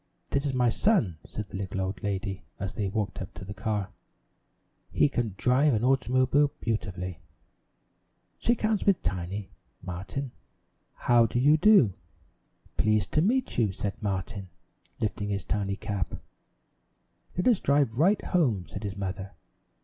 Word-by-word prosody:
"This 140 Hz, +1 st, +1 dB
is 135 Hz, -, -1 dB
my 125 Hz, -1 st, +3 dB
son," 115 Hz, -, +2 dB
said 105 Hz, -2 st, -6 dB
the -, -, -6 dB
little 95 Hz, 0 st, -3 dB
old 95 Hz, 0 st, -3 dB
lady, 100 Hz, -1 st, -3 dB, 0.2 s
as 95 Hz, -2 st, -3 dB
they 105 Hz, -, -1 dB
walked 105 Hz, +1 st, -2 dB
up 90 Hz, -, -8 dB
to 95 Hz, -, -8 dB
the 100 Hz, -, -6 dB
car. 105 Hz, 0 st, -2 dB, 1.0 s
"He -, -, +4 dB
can 120 Hz, -8 st, -2 dB
drive 130 Hz, +4 st, +3 dB
an 110 Hz, -, -1 dB
automobile 130 Hz, +2 st, +3 dB
beautifully. 90 Hz, -6 st, -3 dB, 1.2 s
Shake 240 Hz, -1 st, +1 dB
hands 215 Hz, -2 st, +2 dB
with 195 Hz, -3 st, +3 dB
Tiny, 90 Hz, +2 st, -3 dB, 0.3 s
Martin." 95 Hz, +9 st, -5 dB, 0.6 s
"How 120 Hz, -1 st, +4 dB
do 115 Hz, -, -3 dB
you 145 Hz, +5 st, +5 dB
do?" 155 Hz, -, +6 dB, 0.8 s
"Pleased 110 Hz, -3 st, +2 dB
to 155 Hz, -, +3 dB
meet 245 Hz, -, +1 dB
you," 110 Hz, -4 st, +3 dB
said 100 Hz, +1 st, -4 dB
Martin, 100 Hz, -1 st, -3 dB, 0.5 s
lifting 105 Hz, -2 st, -2 dB
his 100 Hz, -1 st, -2 dB
tiny 100 Hz, -2 st, -1 dB
cap. 100 Hz, -4 st, -3 dB, 1.2 s
"Let 180 Hz, -, +1 dB
us 235 Hz, -6 st, +5 dB
drive 140 Hz, -4 st, +2 dB
right 185 Hz, -, +3 dB
home," 125 Hz, -, +1 dB
said -, -, -7 dB
his 100 Hz, -1 st, -4 dB
mother. 95 Hz, 0 st, -4 dB
105 Hz, 150 wpm, -28 LUFS, 95-135 Hz, 1.2 s, do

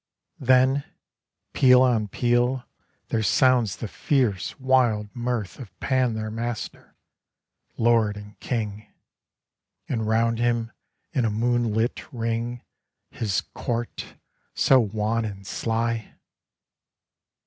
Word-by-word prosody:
Then, 130 Hz, +2 st, +4 dB, 0.7 s
peal 125 Hz, -1 st, +6 dB
on 115 Hz, -5 st, +2 dB
peal, 120 Hz, +4 st, +1 dB, 0.5 s
there 115 Hz, -, 0 dB
sounds 120 Hz, 0 st, +3 dB
the 115 Hz, -, -5 dB
fierce 115 Hz, -4 st, 0 dB
wild 125 Hz, -5 st, +2 dB
mirth 120 Hz, -6 st, -3 dB
Of 120 Hz, -7 st, -11 dB
Pan 130 Hz, -4 st, +1 dB
their 110 Hz, 0 st, -4 dB
master, 115 Hz, +1 st, -5 dB, 0.8 s
lord 115 Hz, -3 st, +3 dB
and 105 Hz, 0 st, -12 dB
king, 110 Hz, -3 st, -3 dB, 0.5 s
— -, -, -58 dB
And 110 Hz, -4 st, -2 dB
round 115 Hz, +1 st, +2 dB
him 120 Hz, -1 st, 0 dB, 0.4 s
in 130 Hz, -5 st, +1 dB
a 115 Hz, -, +2 dB
moonlit 115 Hz, +1 st, 0 dB
ring 115 Hz, 0 st, -3 dB, 0.5 s
His 105 Hz, -4 st, -1 dB
court, 120 Hz, -2 st, -4 dB, 0.4 s
so 135 Hz, -, +5 dB
wan 110 Hz, +1 st, 0 dB
and 100 Hz, -2 st, -6 dB
sly 115 Hz, +1 st, -2 dB
115 Hz, 105 wpm, -25 LUFS, 110-125 Hz, 0.8 s, peal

